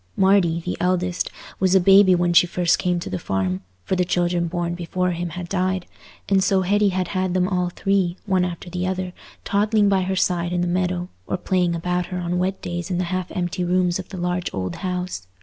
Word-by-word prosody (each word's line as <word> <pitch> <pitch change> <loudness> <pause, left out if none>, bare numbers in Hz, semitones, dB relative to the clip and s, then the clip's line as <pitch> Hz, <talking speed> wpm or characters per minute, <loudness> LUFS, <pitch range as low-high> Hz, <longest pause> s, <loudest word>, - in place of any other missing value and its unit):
Marty, 190 -4 +3
the 180 - -3
eldest, 180 0 0 0.3
was 190 0 +3
a - - +7
baby 195 0 +6
when 175 0 +1
she 175 +1 +6
first 175 0 +1
came 180 -1 0
to - - -5
the 95 - -2
farm, 95 -1 -1 0.2
for 190 - -1
the 180 - +2
children 175 -1 0
born 170 0 -2
before 180 +1 -1
him 175 0 -3
had 175 +1 -6
died, 185 -1 -1 0.4
and 195 -1 +3
so 190 0 +3
Hetty 205 +2 +3
had 185 -2 -1
had 185 -1 -1
them 180 0 +2
all 180 -2 0
three, 190 -1 0
one 190 -3 +2
after 180 0 -4
the 180 +1 -3
other, 185 -1 -3 0.3
toddling 205 0 +2
by 195 -1 +3
her 190 +1 -1
side 180 -2 0
in 175 - 0
the 175 - 0
meadow, 180 0 -1 0.2
or - - -1
playing 180 -2 +1
about 180 +1 -1
her 180 - -4
on 180 0 -1
wet 190 +1 -2
days 175 0 -4
in 180 - -1
the 180 - 0
half 185 -1 -2
empty 180 0 -2
rooms 180 0 +1
of 185 - -7
the 190 - -7
large 180 0 -2
old 95 -2 -3
house. 180 - -4
180 Hz, 220 wpm, -22 LUFS, 175-185 Hz, 0.4 s, a